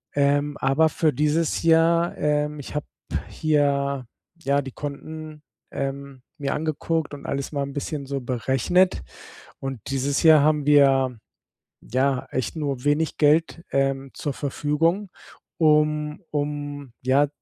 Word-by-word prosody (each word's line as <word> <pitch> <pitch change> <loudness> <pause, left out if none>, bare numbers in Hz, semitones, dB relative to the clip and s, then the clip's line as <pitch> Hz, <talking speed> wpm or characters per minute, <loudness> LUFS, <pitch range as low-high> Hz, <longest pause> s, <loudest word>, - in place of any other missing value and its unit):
Ähm, 145 +1 +2
aber 135 +4 +3
für 155 0 +1
dieses 150 +3 +1
Jahr, 165 +1 +3
ähm 150 0 0
ich - - -9
habe 150 - -2 0.4
hier, 140 -3 +1 0.4
ja, 140 0 +2
die 135 -1 -8
Konten, 155 +2 -7 0.3
ähm, 135 -1 -5 0.2
mir 140 -3 -2
angeguckt 160 0 -2
und 140 - -9
alles 140 0 -3
mal 140 -2 -1
'n 140 - -6
bisschen 145 0 -4
so 135 0 -3
berechnet. 130 - +1 0.6
Und 135 -2 -5
dieses 135 +2 0
Jahr 160 -2 +8
haben 150 -1 +2
wir, 135 -4 +4 0.6
ja, 130 +2 0
echt 130 - -2
nur 140 -5 -3
wenig 150 +2 +1
Geld, 160 +3 +2
ähm, 135 0 0
zur 145 - -3
Verfügung, 155 +8 0 0.5
um 150 0 +2
um, 145 -2 -4
ja, 135 +3 +3
145 Hz, 130 wpm, -24 LUFS, 135-155 Hz, 0.6 s, Jahr